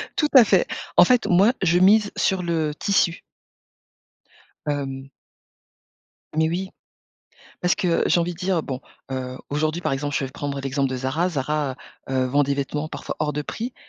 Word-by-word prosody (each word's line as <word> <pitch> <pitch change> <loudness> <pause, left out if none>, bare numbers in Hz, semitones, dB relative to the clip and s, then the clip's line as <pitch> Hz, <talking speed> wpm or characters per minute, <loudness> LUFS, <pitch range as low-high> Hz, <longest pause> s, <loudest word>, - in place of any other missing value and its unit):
Tout 300 - +2
à 260 -3 +10
fait. - - +3 0.3
En - - +9
fait, 250 -2 +3
moi, 195 +7 +5
je 175 -1 +3
mise 205 +2 +5
sur 190 -2 +1
le 160 -3 -1
tissu. 190 -4 +1 1.4
Hem 135 -2 -3 1.3
Mais 160 0 +3
oui. 185 +3 -3 0.9
Parce 180 0 +2
que 170 -3 +1
j'ai 175 - +3
envie 175 +1 -1
de - - -15
dire, 185 -3 0
bon, 130 -3 -4 0.3
heu, 130 -1 -4
aujourd'hui, 155 +3 -1
par - - -1
exemple, 145 +1 -3
je 135 - -2
vais 130 - -8
prendre 140 0 -4
l'exemple 135 0 -1
de 130 - -3
Zara. 135 +8 0
Zara, 145 -2 -2 0.3
heu, 130 -1 +1
vend 140 +3 +2
des 140 0 0
vêtements, 145 +2 -3
parfois, - - -6
hors 150 -1 -1
de 150 - -2
prix 235 - -5
155 Hz, 175 wpm, -23 LUFS, 135-180 Hz, 1.4 s, à